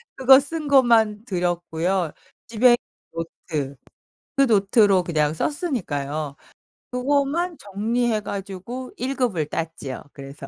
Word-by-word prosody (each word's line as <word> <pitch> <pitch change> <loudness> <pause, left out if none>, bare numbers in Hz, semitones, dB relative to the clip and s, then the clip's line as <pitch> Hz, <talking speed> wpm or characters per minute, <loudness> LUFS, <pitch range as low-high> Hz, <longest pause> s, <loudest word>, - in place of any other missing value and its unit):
그거 265 +1 +7
쓴 305 +1 -5
것만 230 -6 +4
들었고요. 175 -2 -1 0.4
집에 235 +2 +3
있는 - - -9 0.4
노트 155 -4 -5 0.6
그 275 - +5
노트로 205 -3 +4
그냥 155 -2 +1
썼으니까요. 155 - -2 0.6
그거만 285 +7 0
정리해 220 +3 -1
가지고 200 +6 -6
1 265 +2 -2
급을 195 - 0
땄지요, 155 -4 -5
그래서. 140 0 -10
205 Hz, 245 characters per minute, -23 LUFS, 165-255 Hz, 0.6 s, 그거